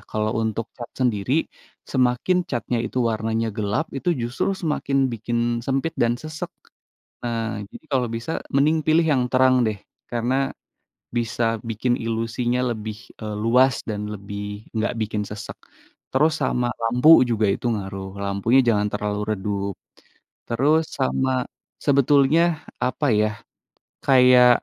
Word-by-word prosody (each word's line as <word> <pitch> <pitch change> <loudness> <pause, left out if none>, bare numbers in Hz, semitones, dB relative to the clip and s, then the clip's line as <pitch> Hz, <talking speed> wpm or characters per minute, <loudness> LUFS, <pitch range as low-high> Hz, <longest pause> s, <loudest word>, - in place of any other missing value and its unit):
kalau 110 0 0
untuk 110 +1 -2
cat 120 -1 -8
sendiri, 125 +4 +1 0.4
semakin 125 +7 +2
catnya 120 -1 -1
itu 130 - -3
warnanya 110 +1 -1
gelap, 105 +8 -1
itu 155 - -3
justru 120 +10 -1
semakin 140 -7 0
bikin 120 +1 -2 0.3
sempit 135 +4 0
dan 120 0 +2
sesak. 155 0 -6 0.7
Nah, 115 -2 -2
jadi - - -12
kalau 125 -3 +2
bisa 115 +8 -4 0.2
mending 150 +3 +3
pilih 160 +1 +4
yang 130 -3 +2
terang 130 -1 +4
deh, 105 -2 -2 0.3
karena 125 +3 0 0.6
bisa 115 -1 0
bikin 120 +3 0
ilusinya 115 +2 -1
lebih, 110 -1 -5 0.2
eee, 105 -1 -4
luas 130 +3 +4
dan 105 -1 -3
lebih 105 +1 -7
enggak 110 +2 0
bikin 105 -1 -1
sesak. 105 +2 -7 0.6
Terus, 155 +4 +3
sama 125 -1 +1
lampu, 125 +6 +3 0.2
juga 110 -2 +2
itu - - -6
ngaruh 95 -1 -5
lampunya 100 +6 +2
jangan 105 -2 +2
terlalu 105 0 -2 0.2
redup, 100 0 -3 0.7
terus 145 +7 +3 0.2
sama 130 0 +1 0.5
sebetulnya 140 +2 +4 0.4
apa 130 +4 -1 0.2
ya, 110 - +3 0.8
kayak 125 -2 +7
120 Hz, 130 wpm, -23 LUFS, 110-130 Hz, 0.8 s, kayak